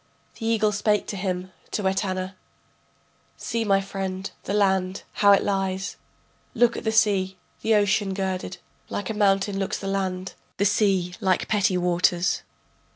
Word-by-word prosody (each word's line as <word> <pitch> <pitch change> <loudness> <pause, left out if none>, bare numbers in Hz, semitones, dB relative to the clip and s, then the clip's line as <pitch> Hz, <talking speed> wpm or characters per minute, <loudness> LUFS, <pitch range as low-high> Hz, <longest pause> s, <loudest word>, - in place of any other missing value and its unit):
The 225 - -3
eagle 220 -2 +2
spake 210 0 +1
to - - -3
him, 185 -1 -3 0.2
to 205 -3 -1
Etana: 190 -1 -1 1.0
See 230 -1 -2
my 195 -2 +3
friend, 195 0 -4
the 195 - -2
land, 190 -2 +1 0.2
how 205 -1 +7
it 200 - +5
lies, 195 -1 -1 0.6
Look 235 0 +4
at - - -5
the 220 - +1
sea, 195 -4 +2 0.2
the 220 0 +3
ocean 205 -1 +2
girded, 185 -1 -3 0.3
Like 205 +1 -3
a - - -2
mountain 195 -1 +2
looks 195 - -1
the - - -8
land, 190 -1 -2 0.2
the 200 - +2
sea 195 -3 +2
like 185 -1 +1
petty 200 -3 +2
waters. 175 0 +2
195 Hz, 155 wpm, -25 LUFS, 185-205 Hz, 1.0 s, how